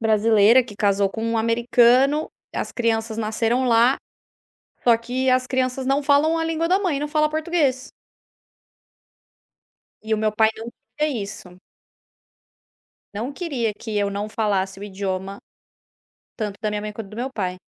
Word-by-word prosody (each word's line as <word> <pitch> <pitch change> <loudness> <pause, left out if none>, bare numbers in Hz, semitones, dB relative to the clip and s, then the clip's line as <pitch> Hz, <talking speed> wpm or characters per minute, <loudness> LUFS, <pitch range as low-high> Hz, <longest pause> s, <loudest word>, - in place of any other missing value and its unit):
brasileira 220 +2 +5
que 210 - -12
casou 200 -1 +2
com 220 +3 -6
um 230 0 0
americano, 240 +5 +3 0.3
as - - -3
crianças 225 -2 -1
nasceram 230 +3 0
lá, 240 +3 +4 0.9
só 235 -2 +5
que 250 +3 -2
as 255 0 +2
crianças 255 0 -1
não 275 +2 +1
falam 295 +3 +3
a 325 - -1
língua 325 +1 -1
da 375 +2 +3
mãe, 350 -8 -1
não 295 - -3
fala 305 0 +2
português. 305 -5 0 2.1
E 220 0 -2
o 220 - +1
meu 215 0 +1
pai 220 0 +4
não 225 +1 -7 0.3
tem 295 -7 0
isso. 195 -3 -9 1.6
Não 230 +7 -4
queria 275 - -2
que 220 -2 -4
eu 200 -1 +1
não 200 +1 -4
falasse 195 -3 -1
o - - -8
idioma, 195 -1 -4 1.0
tanto 210 -3 -4
da 215 - 0
minha 210 0 -2
mãe 210 0 -5
quanto 215 -2 -8
do 215 - -11
meu 255 +3 -3
pai. 185 -6 -3
230 Hz, 155 wpm, -22 LUFS, 210-265 Hz, 2.1 s, brasileira